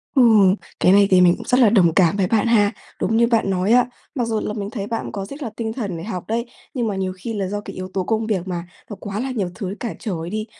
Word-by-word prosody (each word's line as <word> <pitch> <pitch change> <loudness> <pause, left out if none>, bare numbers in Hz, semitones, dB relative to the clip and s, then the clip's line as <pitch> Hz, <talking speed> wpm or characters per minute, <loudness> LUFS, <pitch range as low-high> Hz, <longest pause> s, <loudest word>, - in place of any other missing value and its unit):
Ừ, 265 - +6 0.6
cái 180 - +5
này 200 0 +6
thì 185 - +6
mình 175 -1 +6
cũng 230 - -10
rất 250 - +3
là 235 -4 +6
đồng 180 -7 +4
cảm 185 +1 +3
với 190 - +2
bạn 225 +3 +2
ha. 205 -3 +4 0.3
Đúng 225 - +1
như 235 - +4
bạn 225 -4 +1
nói 185 +2 +1
á, 245 +1 +5 0.3
mặc 245 -4 0
dù 220 -1 0
là 210 - -3
mình 205 -2 -4
thấy 205 -3 -5
bạn 230 -1 -3
cũng - - -7
có 195 -2 -4
rất 280 +8 -8
là 230 - -3
tinh 220 -1 -3
thần 200 -9 -4
để 165 - -7
học 185 -3 -5
đấy, 230 +2 -1 0.3
nhưng 240 -4 -1
mà 205 - -2
nhiều 190 -1 -2
khi 225 +5 -5
là 195 -3 -2
do 205 +1 -3
cái - - -9
yếu 185 0 -6
tố 190 - 0
công 220 +3 -1
việc 190 -4 -1
mà, 175 -1 -4 0.2
nó 205 - -6
quá 205 0 -5
là 260 +2 -2
nhiều 200 -7 -2
thứ 195 -3 -5
cản 235 - -4
trở 210 -6 -3 0.2
đi. 215 0 -3
210 Hz, 300 wpm, -21 LUFS, 190-230 Hz, 0.6 s, Ừ